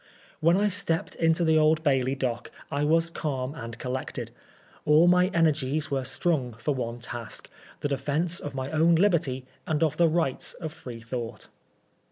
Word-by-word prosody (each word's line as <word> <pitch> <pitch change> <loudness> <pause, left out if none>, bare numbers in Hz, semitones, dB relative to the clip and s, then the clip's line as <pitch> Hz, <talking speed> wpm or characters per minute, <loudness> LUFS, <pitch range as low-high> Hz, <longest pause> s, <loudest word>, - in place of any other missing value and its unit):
When 165 +3 +4
I 205 +1 +3
stepped 185 -4 0
into 165 +1 +2
the 160 -1 +4
Old 155 +1 +3
Bailey 135 -3 +2
dock 120 -3 -3 0.2
I 145 +1 0
was 165 +2 +2
calm 135 -5 -3
and 115 -6 -7
collected. 130 +1 -4 0.5
All 150 +3 +5
my 180 +1 +5
energies 155 -2 +1
were 135 -2 -1
strung 135 -9 0
for 120 +6 -2
one 120 -3 -3
task 120 -1 -7
— - - -23
^the 145 - -1
defence 155 +5 0
of 145 -2 -6
my 130 0 -3
own 165 +2 +4
liberty 165 -8 +2 0.2
and 155 -1 +1
of 155 -1 +1
the 170 - +5
rights 160 -5 0
of 160 -3 -6
Freethought. 115 -3 -7
150 Hz, 170 wpm, -27 LUFS, 130-165 Hz, 0.5 s, All